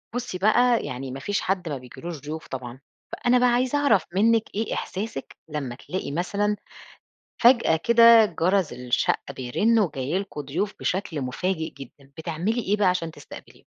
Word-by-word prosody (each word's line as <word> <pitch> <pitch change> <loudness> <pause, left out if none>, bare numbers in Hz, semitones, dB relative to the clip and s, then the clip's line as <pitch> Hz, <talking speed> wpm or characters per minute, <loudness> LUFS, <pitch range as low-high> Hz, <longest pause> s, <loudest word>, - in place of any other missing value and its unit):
بُصّي 245 -6 -3
بقى 230 +5 +3
يعني 130 +1 -5
ما 135 - -6
فيش 200 +9 -1
حد 185 -3 -1
ما 145 - -3
بيجيلوش 150 +6 -8
ضيوف 155 +2 -7
طبعًا، 125 -1 -7 0.3
فأنا 245 +2 +2
بقى 250 0 +4
عايزة 250 +3 +1
أعرف 220 - +3
منِّك 225 +2 +4
إيه 220 +1 -1
إحساسِك 195 -7 -5
لمّا 140 -5 -4
تلاقي 175 +1 -5
مثلًا 200 +6 0 0.9
فجأة 235 -8 +5
كده 230 -1 +7
جرس 180 -2 0
الشقة 125 +2 -1
بيرن 205 - +1
وجاي 155 -3 -1
لكم 190 -7 -6
ضيوف 175 +9 -3
بشكل 180 -5 -2
مفاجئ 160 +6 -2
جدًا، 135 +1 -13
بتعملي 175 +9 -2
إيه 210 +1 0
بقى 205 - +3
علشان 175 -3 0
تستقبليهُم؟ - - -13
185 Hz, 155 wpm, -25 LUFS, 145-220 Hz, 0.9 s, كده